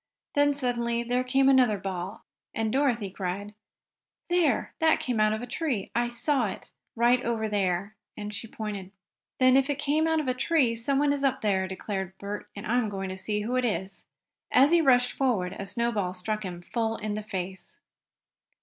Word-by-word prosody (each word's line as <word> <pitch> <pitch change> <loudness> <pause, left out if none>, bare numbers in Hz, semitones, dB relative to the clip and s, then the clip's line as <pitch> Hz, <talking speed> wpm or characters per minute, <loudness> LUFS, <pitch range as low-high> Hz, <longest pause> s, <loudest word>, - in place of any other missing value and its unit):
Then, 290 -1 +3
suddenly 235 -3 0
there 245 +1 0
came 265 +1 +3
another 255 -6 +5
ball, 190 -1 -5 0.3
and 220 -1 -1
Dorothy 245 -8 +1
cried: 195 +2 -4 0.8
"There, 350 -2 +2
that 320 -1 +4
came 245 -3 -1
out 215 0 +4
of 220 +2 -2
a - - -3
tree, 250 - -2
for - - +1
I 240 0 0
saw 245 0 +1
it. 190 - -7 0.2
Right 240 +2 +3
over 225 -2 -1
there," 200 0 -1 0.2
and 210 0 -5
she 205 +3 -5
pointed. 210 -4 -5 0.5
"Then 255 0 +6
if 270 +1 +3
it 285 - 0
came 300 +3 +1
out 320 0 +2
of 300 - -3
a 255 - +2
tree 265 -2 +2
someone 275 +5 +1
is 280 -1 -2
up 270 -2 +1
the 210 - +2
tree!" 190 -1 +1
declared 190 0 -4
Bert, 200 +1 -6
"and 200 +2 -7
I'm 240 -1 +1
going 195 -1 -4
to 185 - -4
see 210 +2 -2
who 235 +4 -2
it 255 - +2
is." 195 -4 -3 0.4
As 275 +4 +6
he 340 -1 +6
rushed 250 -4 +4
forward 220 -10 0
a 195 - -4
snowball 215 -5 -1
struck 215 +4 -2
him 175 -2 -6
full 225 +2 -1
in 215 -1 -3
the 215 - -3
face. 190 -2 -6
230 Hz, 195 wpm, -27 LUFS, 200-255 Hz, 0.8 s, Then